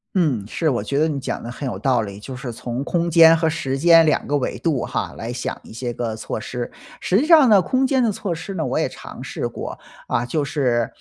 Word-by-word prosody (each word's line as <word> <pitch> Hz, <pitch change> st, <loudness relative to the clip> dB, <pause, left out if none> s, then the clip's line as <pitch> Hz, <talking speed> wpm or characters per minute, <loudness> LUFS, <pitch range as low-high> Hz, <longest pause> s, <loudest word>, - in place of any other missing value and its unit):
嗯， 140 Hz, -, +1 dB
是， 160 Hz, +6 st, 0 dB
我 125 Hz, -, -1 dB
觉 140 Hz, +1 st, -1 dB
得 160 Hz, -, +3 dB
你 145 Hz, -3 st, -2 dB
讲 -, -, -4 dB
得 115 Hz, -, -7 dB
很 135 Hz, +2 st, -5 dB
有 95 Hz, -5 st, -4 dB
道 125 Hz, -1 st, +2 dB
理， 100 Hz, -1 st, -7 dB
就 130 Hz, +4 st, -8 dB
是 125 Hz, -2 st, -6 dB
从 120 Hz, +3 st, -4 dB
空 170 Hz, +1 st, 0 dB
间 165 Hz, 0 st, +7 dB
和 160 Hz, 0 st, +1 dB
时 135 Hz, -4 st, -2 dB
间 165 Hz, 0 st, +7 dB
两 155 Hz, -, +1 dB
个 145 Hz, +1 st, +1 dB
维 130 Hz, -, -3 dB
度 150 Hz, -8 st, 0 dB
哈， -, -, -3 dB
来 115 Hz, +2 st, -5 dB
想 125 Hz, -, -4 dB
一 -, -, -13 dB
些 120 Hz, +1 st, -4 dB
个 115 Hz, -2 st, -3 dB
措 110 Hz, -, -5 dB
施。 120 Hz, +2 st, -5 dB, 0.3 s
实 190 Hz, -, +2 dB
际 290 Hz, -, +1 dB
上 310 Hz, -6 st, +7 dB
呢， 205 Hz, -2 st, +7 dB
空 260 Hz, +5 st, +1 dB
间 265 Hz, -2 st, +2 dB
的 225 Hz, -, +2 dB
措 195 Hz, -3 st, -3 dB
施 180 Hz, +5 st, -7 dB
呢， 165 Hz, -4 st, -2 dB
我 130 Hz, -, -1 dB
也 -, -, +1 dB
尝 -, -, -10 dB
试 -, -, -3 dB
过， -, -, -6 dB, 0.3 s
啊， 120 Hz, -, 0 dB
就 145 Hz, +4 st, -1 dB
是， 120 Hz, -6 st, 0 dB
140 Hz, 275 characters per minute, -21 LUFS, 120-170 Hz, 0.3 s, 间